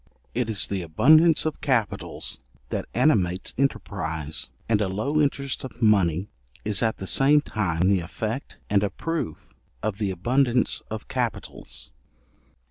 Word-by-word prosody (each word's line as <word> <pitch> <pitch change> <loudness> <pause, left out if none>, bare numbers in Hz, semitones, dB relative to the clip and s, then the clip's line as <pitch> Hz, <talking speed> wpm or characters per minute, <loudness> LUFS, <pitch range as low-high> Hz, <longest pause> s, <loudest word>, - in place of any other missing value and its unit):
It 120 -2 -1
is 105 -3 0
the 100 -2 -2
abundance 155 - +5
of 155 - -2
capitals 120 -7 -1 0.3
that - - -3
animates 95 - +2
enterprize; 80 - -2 0.2
and 110 -2 +2
a 105 - +1
low 135 +11 0
interest 140 -2 -1
of 130 -2 -8
money 100 -5 +3 0.4
is 105 -2 0
at 110 -1 +1
the 95 - -6
same 140 +8 +4
time 95 - 0
the 100 -1 +4
effect 110 +9 -5
and 100 -1 +3
a 100 - +1
proof 95 - -4 0.3
of 105 -1 -2
the 105 -2 0
abundance 120 +7 +1
of - - -6
capitals. 60 -2 -4
105 Hz, 140 wpm, -25 LUFS, 90-130 Hz, 0.4 s, abundance